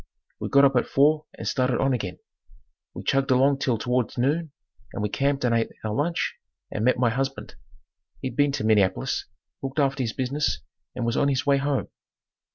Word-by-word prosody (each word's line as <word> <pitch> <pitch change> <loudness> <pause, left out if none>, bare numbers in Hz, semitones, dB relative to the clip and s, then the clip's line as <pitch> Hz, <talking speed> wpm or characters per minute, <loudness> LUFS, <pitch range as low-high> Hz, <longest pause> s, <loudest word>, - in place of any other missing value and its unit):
We - - -4
got 140 0 +6
up 135 -1 +3
at - - +1
four 150 +2 +3
and - - -5
started 125 -2 +1
on 135 0 +2
again. 100 -7 -3 0.8
We - - -6
chugged 135 +1 +1
along 135 +2 +4
till 130 -5 +1
towards 125 +2 -1
noon 150 +5 0 0.4
and 105 - -3
we 105 - 0
camped 140 +4 0
and 120 - +2
ate 115 -1 +1
our 110 -1 -2
lunch 165 +8 -1 0.3
and 110 - -2
met 125 +2 +3
my 120 -2 +2
husband. 135 +2 -3 0.7
He'd 130 -3 -5
been 145 +1 +3
to 140 - -2
Minneapolis, 110 +4 +1 0.3
looked 135 +1 -5
after 140 -2 +1
his 115 -3 -1
business 140 +3 -1 0.3
and 120 - -2
was 115 - 0
on 140 - +3
his 135 -2 0
way 140 -1 +4
home. 140 0 -1
135 Hz, 190 wpm, -25 LUFS, 120-140 Hz, 0.8 s, got